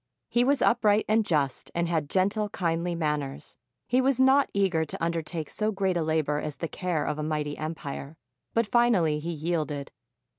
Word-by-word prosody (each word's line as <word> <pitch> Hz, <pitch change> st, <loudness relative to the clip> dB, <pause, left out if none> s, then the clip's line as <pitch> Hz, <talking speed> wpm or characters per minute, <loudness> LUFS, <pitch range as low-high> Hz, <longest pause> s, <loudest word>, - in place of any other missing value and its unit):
He 240 Hz, -, +3 dB
was 275 Hz, +2 st, +2 dB
upright 215 Hz, -3 st, +3 dB
and 220 Hz, +1 st, +3 dB
just 145 Hz, -8 st, -1 dB
and 170 Hz, 0 st, +1 dB
had 160 Hz, -4 st, -1 dB
gentle, 200 Hz, +3 st, +1 dB
kindly 170 Hz, -1 st, -1 dB
manners. 150 Hz, -4 st, -3 dB, 0.3 s
He 250 Hz, +2 st, +3 dB
was 260 Hz, -1 st, +1 dB
not 265 Hz, +2 st, +5 dB
eager 190 Hz, -5 st, +1 dB
to 160 Hz, -, -6 dB
undertake 165 Hz, -1 st, -2 dB
so 215 Hz, 0 st, -1 dB
great 190 Hz, -2 st, 0 dB
a 170 Hz, -, +1 dB
labor 155 Hz, -2 st, 0 dB
as 150 Hz, -1 st, -4 dB
the 165 Hz, -, -4 dB
care 175 Hz, -2 st, -2 dB
of 150 Hz, 0 st, -2 dB
a -, -, -2 dB
mighty 150 Hz, -1 st, -2 dB
empire, 155 Hz, -1 st, -6 dB, 0.4 s
but 230 Hz, 0 st, +3 dB
finally 205 Hz, -10 st, +3 dB
he 160 Hz, +3 st, -5 dB
yielded. 155 Hz, -3 st, -2 dB
170 Hz, 180 wpm, -27 LUFS, 155-210 Hz, 0.4 s, not